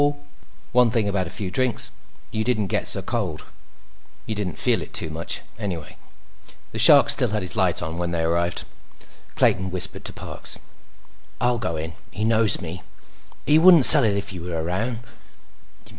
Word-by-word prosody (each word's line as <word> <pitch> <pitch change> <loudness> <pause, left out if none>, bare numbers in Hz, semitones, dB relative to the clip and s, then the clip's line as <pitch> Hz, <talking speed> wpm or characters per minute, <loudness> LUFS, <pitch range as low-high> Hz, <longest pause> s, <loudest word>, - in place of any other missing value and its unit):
One 125 -1 +4
thing 110 -3 0
about 95 -3 -1
a - - -7
few 95 -1 -5
drinks; 130 +4 0 0.4
you 110 0 -2
didn't 110 -5 -1
get - - -1
so - - 0
cold. 95 -10 -4 0.8
You 110 - -4
didn't 100 -5 -4
feel - - +1
it - - -10
too 80 - -1
much, 80 +2 -4 0.2
anyway. 85 -8 -6 0.8
The - - -5
Shark - - +7
still - - +5
had 105 -1 -2
his 90 - -5
light 95 -4 +1
on 80 +1 -5
when 85 0 -2
they 85 -1 -2
arrived. 85 +2 0 0.7
Clayton 95 0 +1
whispered 90 +1 -3
to - - -3
Parks: - - -6 0.8
"I'll 120 -1 0
go 85 -8 -3
in. 80 +1 -5 0.2
He 105 - -5
knows 110 -1 +4
me. 90 +1 -7 0.6
He 150 +1 +5
wouldn't 170 -5 +7
sell 150 -4 +9
it 105 -3 +1
if 100 0 -4
you 90 - -8
were 85 -1 -4
around. 110 +8 -3
100 Hz, 175 wpm, -22 LUFS, 85-115 Hz, 0.8 s, sell